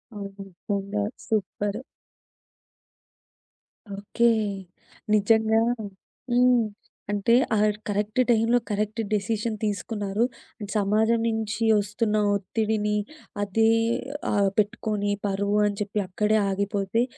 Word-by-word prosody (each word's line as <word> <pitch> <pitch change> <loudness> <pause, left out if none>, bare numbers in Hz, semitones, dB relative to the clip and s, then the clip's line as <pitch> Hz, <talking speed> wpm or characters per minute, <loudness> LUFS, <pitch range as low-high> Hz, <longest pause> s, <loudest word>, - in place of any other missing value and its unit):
అవును. 200 -1 -5 0.2
నిజంగా! 195 - -3 0.2
Super. 205 +1 -2 2.2
Okay. 210 +4 -1 0.9
నిజంగా. 220 +1 +4 0.7
హ్మ్. 245 -1 +4 0.5
అంటే 205 +3 +3 0.2
ఆ - - +2 0.3
కరెక్ట్ 210 +3 -1
టైమ్‌లో 230 +1 +4
కరెక్ట్ 210 +2 -1
డెసిషన్ 215 +2 -1
తీసుకున్నారు. 205 +1 -1 0.4
అండ్ 205 -1 -6
సమాజం 215 +3 +2
నుంచి 220 -1 -2 0.2
ఒస్తున్న 210 +2 -1 0.2
ఒత్తిడిని 210 +1 -1 0.5
అదే 220 +3 +2 0.6
ఆహ్, 200 -2 +3
పెట్టుకొని 210 -1 0 0.2
పరువు 200 +1 0
అని 205 -1 -3
చెప్పి 210 0 -1
అక్కడే 210 +4 +1
ఆగిపోతే 200 +2 0
210 Hz, 90 wpm, -25 LUFS, 200-220 Hz, 2.2 s, నిజంగా